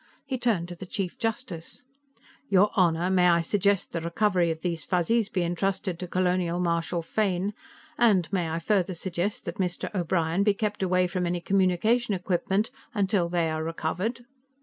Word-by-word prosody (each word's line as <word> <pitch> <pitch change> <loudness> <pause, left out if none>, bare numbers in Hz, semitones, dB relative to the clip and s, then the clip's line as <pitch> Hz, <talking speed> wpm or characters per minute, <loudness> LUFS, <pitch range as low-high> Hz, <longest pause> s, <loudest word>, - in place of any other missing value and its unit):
He 265 -2 -3
turned 215 -9 +1
to 175 - -6
the 185 +2 -9
Chief 190 -2 -4
Justice. 225 -8 -4 0.7
"Your 195 +1 +4
Honor, 175 -1 +2
may 180 -1 +4
I 170 -1 +4
suggest 200 +2 +1
the 170 - -3
recovery 175 +1 +1
of 160 -1 -3
these 170 -4 -2
Fuzzies 200 +6 +1
be 185 -4 0
entrusted 185 +1 -1
to 180 - -4
Colonial 180 -1 0
Marshal 170 0 0
Fane, 195 +1 0 0.5
and 205 -8 +4
may 175 -4 0
I 160 - -2
further 185 +1 0
suggest 190 +7 -3
that - - -5
Mr. 180 +1 -2
O'Brien 170 -1 0
be 200 0 +3
kept 210 0 -2
away 185 -1 +2
from 180 0 -1
any 175 0 -1
communication 195 +5 +2
equipment 190 +3 0 0.2
until 195 -4 +1
they 170 -1 +1
are 155 0 -2
recovered." 180 +9 -3
180 Hz, 170 wpm, -27 LUFS, 170-200 Hz, 0.7 s, Your